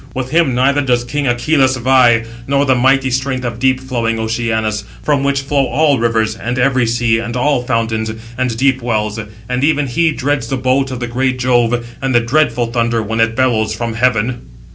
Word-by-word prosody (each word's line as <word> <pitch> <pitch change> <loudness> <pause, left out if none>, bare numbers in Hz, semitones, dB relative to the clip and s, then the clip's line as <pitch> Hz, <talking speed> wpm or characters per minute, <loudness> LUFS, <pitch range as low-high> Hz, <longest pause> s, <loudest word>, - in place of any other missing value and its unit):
With 130 0 -4
him 160 -6 +2
neither 140 +3 +2
does 125 -3 +1
king 145 +3 -3
Acheloüs 130 +2 +2
vie, 120 -2 +4 0.2
nor 140 +1 +2
the 135 - +3
mighty 130 +1 +2
strength 130 0 -2
of 115 -1 -4
deep 130 0 +2
flowing 120 -4 -2
Oceanus, 110 -1 -2 0.2
from 145 -2 +1
which 140 0 0
flow 140 -1 0
all 145 -3 +2
rivers, 110 -1 0
and 120 +3 -4
every 130 -1 +2
sea, 115 -1 +1
and 120 +1 -4
all 140 0 +1
fountains, 115 -2 -1 0.2
and 125 -2 -2
deep 135 +1 +1
wells; 110 -2 -2 0.3
but 125 +3 -2
even 145 -1 +2
he 160 +6 +1
dreads 145 -4 -2
the 135 - -2
bolt 130 +1 +1
of 130 -1 -6
the - - -1
great 130 +2 -1
Jove, 120 -1 +1 0.2
and 135 -2 -1
the - - +6
dreadful 120 -2 0
thunder, 115 -1 0
when 110 +2 -3
it 115 0 +2
bellows 110 -4 +1
from 115 +1 -3
heaven." 120 - -1
125 Hz, 195 wpm, -15 LUFS, 115-135 Hz, 0.3 s, the